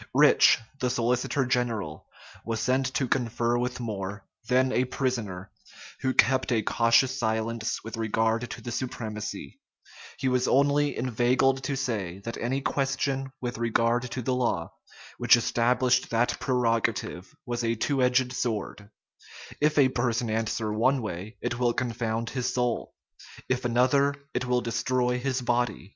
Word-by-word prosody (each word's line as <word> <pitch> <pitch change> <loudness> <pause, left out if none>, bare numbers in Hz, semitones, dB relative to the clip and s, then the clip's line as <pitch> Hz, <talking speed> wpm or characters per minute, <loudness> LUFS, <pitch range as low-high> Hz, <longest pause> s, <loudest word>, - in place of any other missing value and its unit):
Rich, - - +6 0.2
the 125 - 0
solicitor 125 +3 0
general, 115 -11 -2 0.4
was 115 -1 -3
sent 130 +2 +1
to 130 - +1
confer 120 -1 0
with 125 +1 -2
More, 100 -3 -5 0.2
then 130 +1 +3
a 130 0 +2
prisoner, 115 -8 -3 0.5
who 130 - 0
kept 130 0 +3
a 110 -3 +2
cautious 120 +5 +3
silence 110 0 -1
with 115 0 -7
regard 115 +2 0
to - - -7
the 120 - -5
supremacy: 110 -4 -5 0.6
he 135 - -1
was 125 0 +1
only 145 +1 +2
inveigled 130 +2 +2
to 140 - -1
say, 105 -9 -2
that 115 - -4
any 130 +4 -1
question 135 0 -1
with 120 -2 -4
regard 115 +1 +1
to 125 +1 -4
the 130 - 0
law 120 -10 -1 0.5
which - - +6
established 125 +1 +2
that 115 +1 +1
prerogative 115 -7 -1
was 120 -1 -3
a 115 0 +1
two 135 +4 0
edged 125 0 +2
sword; 105 -4 -3 0.7
if 150 +1 +2
a 135 -3 +6
person 120 -2 -1
answer 110 -1 -1
one 125 +4 +2
way, 105 +2 -6
it 120 - -2
will 120 -1 +2
confound 115 -2 -2
his 125 -1 -1
soul; 125 -1 -1 0.5
if 130 -1 -1
another, 130 +4 +3 0.2
it 125 +1 -1
will 125 0 +2
destroy 125 +1 0
his 130 0 -1
body. 120 -5 -1
120 Hz, 150 wpm, -27 LUFS, 115-130 Hz, 0.7 s, Rich